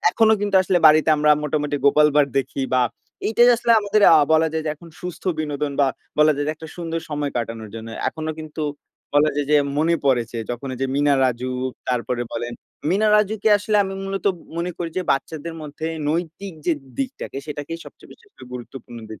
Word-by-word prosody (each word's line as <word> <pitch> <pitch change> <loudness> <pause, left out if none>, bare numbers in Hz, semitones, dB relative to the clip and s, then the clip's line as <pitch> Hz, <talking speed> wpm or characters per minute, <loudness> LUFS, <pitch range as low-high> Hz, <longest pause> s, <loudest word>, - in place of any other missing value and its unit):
এখনো 220 -1 +4
কিন্তু 205 -2 +1
আসলে 185 0 +2
বাড়িতে 155 +1 +5
আমরা 150 0 +3
মোটামুটি 150 0 -1
'গোপাল 150 +2 +6
ভাঁড়' 145 -2 +4
দেখি। 135 +1 -2
বা 130 - +4 0.4
এইটাই 240 +2 +5
আসলে 235 0 +2
আমাদের 205 0 +1
আ - - +8 0.2
বলা 160 0 +4
যায় 160 0 -1
যে - - +1
এখন 170 +3 -15
সুস্থ 180 -1 -7 0.2
বিনোদন 150 -2 -2
বা 140 - +5 0.3
বলা 150 0 +6
যায় 145 - -1
যে 155 - 0
একটা 160 +1 -10
সুন্দর 165 -1 -3
সময় 145 -1 -2
কাটানোর 115 -2 -4
জন্য। 115 0 -7 0.2
এখনো 155 0 -4
কিন্তু 155 0 -6 0.5
বলা 150 +1 +5
যায় 145 -1 0
যে, 150 - +6 0.2
মনে 165 +2 +3
পড়ে 130 -3 +3
যে 115 - -4
যখন 120 +3 -5
ঐযে 135 +2 -2
মিনা-রাজু, 135 -4 +2 0.4
তারপরে 125 0 -1
বলেন 120 +1 -4 0.4
মিনা-রাজুকে 210 +2 +3
আসলে 210 +1 0
আমি 195 0 -5
মূলত 195 0 -4
ম - - -16 0.2
মনে 170 +1 -2
করি 170 -1 -3
যে, - - -1
বাচ্চাদের 160 +4 -4
মধ্যে 150 +1 -6 0.2
নৈতিক 175 +4 -3
যে 175 - +4 0.3
দিকটাকে, 270 - -4
সেটাকেই 150 +2 -5
সবচেয়ে - - -15
বেশি 465 - -21
করে - - -13
গুরুত্বপূর্ণ 120 -1 -9
দিক। 110 - -9
155 Hz, 190 wpm, -22 LUFS, 140-175 Hz, 0.5 s, আ